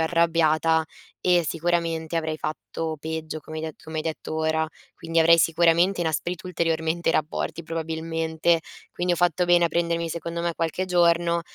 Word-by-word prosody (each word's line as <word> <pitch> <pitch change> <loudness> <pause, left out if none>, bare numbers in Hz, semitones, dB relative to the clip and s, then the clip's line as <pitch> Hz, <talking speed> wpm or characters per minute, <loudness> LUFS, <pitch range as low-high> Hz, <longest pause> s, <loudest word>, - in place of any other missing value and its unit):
arrabbiata 160 -1 +2 0.4
e 175 -2 +3
sicuramente 165 -1 -1
avrei 160 -1 -1
fatto 155 +1 -4
peggio, 160 0 -5
come 155 +1 -9
hai - - -5
de 160 - -4
come 160 0 -7
hai 155 - -1
detto 160 0 -4
ora. 160 0 0 0.3
Quindi 165 0 -2
avrei 165 +1 +6
sicuramente 170 +3 +3
inasprito 170 +2 -2
ulteriormente 165 -1 0
rapporti 155 +2 -2
probabilmente, 165 0 -1 0.3
quindi 175 0 0
ho - - -8
fatto 175 0 +2
bene 175 0 +5
a - - +2
prendermi 170 0 0
secondo 170 +1 -4
me 170 0 0
qualche 165 +3 -1
giorno, 170 -1 +3
165 Hz, 155 wpm, -25 LUFS, 160-170 Hz, 0.4 s, avrei